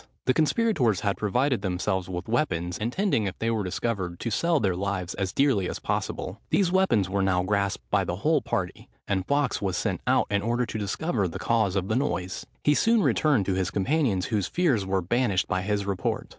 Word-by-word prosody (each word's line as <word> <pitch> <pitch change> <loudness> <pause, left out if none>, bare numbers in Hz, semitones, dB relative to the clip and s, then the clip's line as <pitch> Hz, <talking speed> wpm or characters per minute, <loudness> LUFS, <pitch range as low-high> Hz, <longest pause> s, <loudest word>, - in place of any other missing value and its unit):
The 130 - +3
conspirators 155 - +2
had 100 -2 0
provided 125 +3 0
themselves 95 0 -1
with 90 0 -5
weapons, 90 - -1
intending, 120 - 0
if 95 - -5
they 115 +1 0
were 110 -2 0
discovered, 95 -2 -3
to 115 - -2
sell 170 +7 +2
their 95 -5 +1
lives 95 -1 -2
as 95 -2 -2
dearly 120 -7 +2
as - - -4
possible. 95 +4 -3
These 190 -3 +2
weapons 180 - +3
were 100 +1 -1
now 95 -2 +2
grasped 100 -9 -1
by - - +3
the - - -2
whole - - +2
party; - - -3 0.2
and 95 -2 0
Fawkes 140 -3 +1
was 95 -3 -1
sent - - -1
out - - +3
in 100 -1 +2
order 120 +3 0
to 110 - -5
discover 105 - -1
the 85 +2 -6
cause 100 0 +1
of 95 -1 0
the 110 - 0
noise. 90 -9 -2 0.2
He 150 - +4
soon 225 +6 +3
returned 140 -10 +2
to 95 - 0
his 95 -1 0
companions, 105 - +1
whose 105 -5 -1
fears 135 - +1
were 95 -1 0
banished 105 -1 +1
by 95 0 0
his 100 +1 -1
report. 95 -2 -2
100 Hz, 205 wpm, -26 LUFS, 95-125 Hz, 0.2 s, He